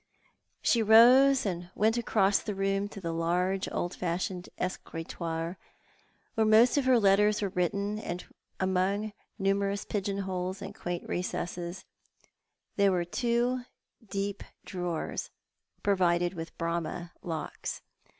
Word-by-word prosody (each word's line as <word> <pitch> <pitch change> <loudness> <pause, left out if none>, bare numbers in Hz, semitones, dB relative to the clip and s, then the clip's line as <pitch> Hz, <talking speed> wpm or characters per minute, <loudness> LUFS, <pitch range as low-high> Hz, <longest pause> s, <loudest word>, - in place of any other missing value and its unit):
She 235 - +4
rose, 250 +5 +7
and 175 -2 -3
went 220 +2 +3
across 205 -4 +3
the 210 - -4
room 195 +1 0
to 205 - -9
the 165 -3 -3
large 180 +3 0
old 175 - -2
fashioned 180 +1 -3
escritoire, 165 -1 -4 0.7
where 220 - +2
most 220 +3 +6
of 285 -2 +2
her 255 -2 +5
letters 210 +1 +4
were 200 - 0
written, 200 +4 -1
and 180 -4 -5
where, - - -24 0.3
among 190 +3 0 0.2
numerous 195 +1 0
pigeon 200 -1 -2
holes 185 -1 -3
and 200 - -7
quaint 175 -4 -5
recesses, 175 0 -3 0.9
there 200 -1 +5
were 175 -2 +1
two 240 +5 0 0.4
deep 200 -1 -3 0.2
drawers, 175 -3 -3 0.5
provided 175 -3 +2
with 165 -2 -7
Bramah 170 +1 -3
locks. 160 -3 -5
195 Hz, 125 wpm, -29 LUFS, 175-210 Hz, 0.9 s, rose